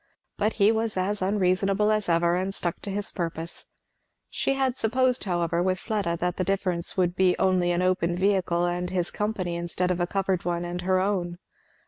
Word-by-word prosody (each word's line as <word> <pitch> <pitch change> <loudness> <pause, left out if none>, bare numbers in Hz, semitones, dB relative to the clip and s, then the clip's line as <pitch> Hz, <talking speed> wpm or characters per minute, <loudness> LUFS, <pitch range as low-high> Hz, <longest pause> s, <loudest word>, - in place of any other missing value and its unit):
But 215 +2 0
he 205 0 +4
was 225 -2 -1
as 200 +2 -1
unreasonable 195 +1 +2
as 215 -3 0
ever, 170 +1 +3
and 185 +2 -1
stuck 175 -3 -2
to 205 - -5
his 200 +1 -3
purpose. 165 -1 -5 0.6
She 275 - 0
had 265 -2 0
supposed 255 +2 +1
however, 170 -2 0
with 185 +1 +1
Fleda, 195 -5 -2
that 180 +1 -2
the 185 - 0
difference 185 -2 -1
would 180 -1 +1
be 185 -1 +3
only 185 -2 +2
an 175 +1 +1
open 180 -2 +1
vehicle 185 -2 +1
and 175 0 -2
his 180 -2 -1
company 205 -5 -2
instead 175 +1 -1
of 180 - -1
a 175 - 0
covered 190 -1 -1
one 175 0 -2
and 175 +1 -4
her 185 +1 +2
own. 185 -3 -1
185 Hz, 190 wpm, -26 LUFS, 175-200 Hz, 0.6 s, he